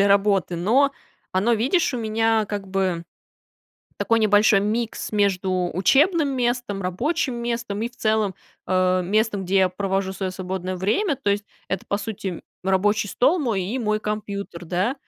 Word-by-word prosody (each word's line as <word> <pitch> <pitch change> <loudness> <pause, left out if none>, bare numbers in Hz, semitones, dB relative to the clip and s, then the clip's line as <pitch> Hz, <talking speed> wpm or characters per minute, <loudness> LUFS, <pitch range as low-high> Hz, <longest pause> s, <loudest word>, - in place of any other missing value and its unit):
для 200 - +4
работы. 195 -3 +2
Но 250 +11 +3 0.4
оно, 200 +6 +2
видишь, 260 - +2
у 245 - -2
меня 225 0 +1
как 200 -1 -4
бы 185 -3 -1 0.9
такой 230 0 +1
небольшой 210 -1 +5
микс 220 +3 -2
между 185 -3 +1
учебным 290 - +3
местом, 240 -5 -1
рабочим 255 - -1
местом 235 -3 -3
и, 235 - -1
в 245 - -25
целом, 215 -3 +1 0.3
э, 185 0 +2
местом, 210 +1 +1
где 185 +2 0
я 190 -1 +5
провожу 195 +1 -2
свое 190 -1 -3
свободное 185 0 -4
время. 270 - +1
То 250 -6 -1
есть 200 +1 0 0.2
это, 195 - -3
по 200 - 0
сути, 200 -4 -5 0.2
рабочий 205 +3 +1
стол 305 - +2
мой 225 -9 0
и 210 +8 -3
мой 215 -2 +1
компьютер, 200 -4 -5
да. 185 +9 0
205 Hz, 160 wpm, -23 LUFS, 190-230 Hz, 0.9 s, небольшой